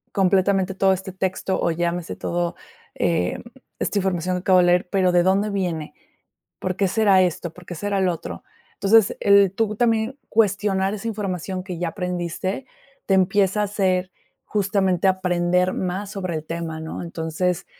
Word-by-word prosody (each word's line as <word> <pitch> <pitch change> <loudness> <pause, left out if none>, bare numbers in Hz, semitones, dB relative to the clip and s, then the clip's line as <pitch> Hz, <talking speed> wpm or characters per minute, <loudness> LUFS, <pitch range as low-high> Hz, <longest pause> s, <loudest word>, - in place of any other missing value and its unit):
completamente 190 0 +2
todo 195 0 +3
este 190 0 -4
texto 190 0 -2
o - - +1
llámese 170 +1 -2
todo, 175 0 -2 0.4
em, - - 0 0.4
esta 205 - -1
información 185 -2 0
que - - -3
acabo 185 0 +4
de 180 - +5
leer, 175 +1 +3
pero, 185 -2 +3
¿de 175 - +4
dónde 195 +3 +2
viene? 175 -6 -3 0.6
¿Por 185 -1 -3
qué 195 -1 +1
será 195 -1 +4
esto? 175 -1 -1
¿Por 180 +1 -14
qué 175 - -6
será 200 +3 -1
lo 185 -2 +2
otro? 165 - -7 0.3
Entonces, 205 +1 +4
el 200 -1 +5
tú 215 +1 -1
también 230 +3 +1
cuestionar 200 -2 +1
esa 215 +2 -5
información 190 -3 -3
que 180 -3 -6
ya 175 0 -1
aprendiste, 180 +5 -3 0.4
te 195 - +3
empieza 195 +2 +2
a - - +2
hacer, 190 -3 0 0.3
justamente, 195 -3 +1
aprender 180 -1 +1
más 190 +2 -3
sobre 185 -4 -4
el 155 -1 -4
tema, 165 -1 -5
¿no? 160 0 -6
Entonces, 170 +1 -2
185 Hz, 165 wpm, -22 LUFS, 175-200 Hz, 0.6 s, de